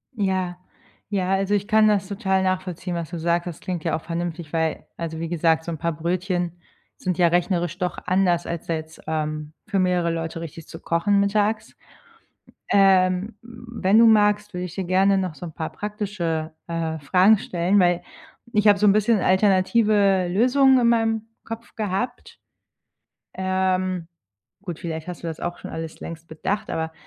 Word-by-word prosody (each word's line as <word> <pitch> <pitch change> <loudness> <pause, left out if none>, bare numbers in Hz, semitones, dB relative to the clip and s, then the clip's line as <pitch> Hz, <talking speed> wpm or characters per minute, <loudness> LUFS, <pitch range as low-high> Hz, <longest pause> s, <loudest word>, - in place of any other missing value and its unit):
Ja, 190 -4 -1 0.5
ja, 190 -3 -1
also, 195 +1 +1
ich 200 0 -1
kann 215 0 +5
das 200 -2 +2
total 190 -2 0
nachvollziehen, 185 -1 -2
was 170 -2 -4
du 170 - -5
sagtest. 170 0 -1
Klingt 175 -4 -4
ja 165 -2 0
auch 160 - -4
vernünftig, 170 -1 -4
weil 160 -1 -1
also, 160 -1 -5
wie 165 0 -4
gesagt, 165 -1 +2
so 170 - -5
'n 160 - -4
paar 170 - 0
Brötchen 175 +1 -2 0.4
sind 180 -2 -2
ja 175 - +5
rechnerisch 175 0 0
doch 180 -1 -2
anders 180 -2 +2
als 170 -1 -5
da 165 - 0
jetzt, 160 0 -8
ähm, 155 -1 -3
für 200 -2 0
mehrere 180 -2 +1
Leute 165 0 -4
richtig 165 0 -9
zu - - -10
kochen 200 +5 +1
mittags. 210 +2 0 0.9
Ähm, 190 +1 +3
wenn 230 -3 0
du 230 - +7
magst, 210 -1 +3
würde 180 0 -4
ich 180 - -7
dir 190 - -3
gerne 190 +2 +3
noch 185 -4 -2
so 175 - -7
'n 165 - -8
paar 160 - -4
praktische, 195 -7 -3
äh, 165 -1 -3
Fragen 185 +9 +5
stellen, 180 +2 +1
weil 175 -2 +3 0.5
ich 210 0 +2
hab 205 - +6
so 210 - +3
'n 200 - +7
bisschen 215 +1 +3
alternative 195 0 +3
Lösungen 255 +7 +4
in 235 - +3
meinem 225 -1 +2 0.2
Kopf 225 +1 -8
gehabt. 210 +1 -3 1.0
Ähm, 185 -2 -1 0.5
gut, 175 -5 -6
vielleicht 160 -3 -5
hast 180 - -7
du - - -5
das 160 - -6
auch 175 0 -4
schon - - -8
alles 160 -1 -6
längst 165 0 -8
bedacht, 205 +7 -3
aber 160 0 -2
185 Hz, 175 wpm, -23 LUFS, 170-205 Hz, 1.0 s, du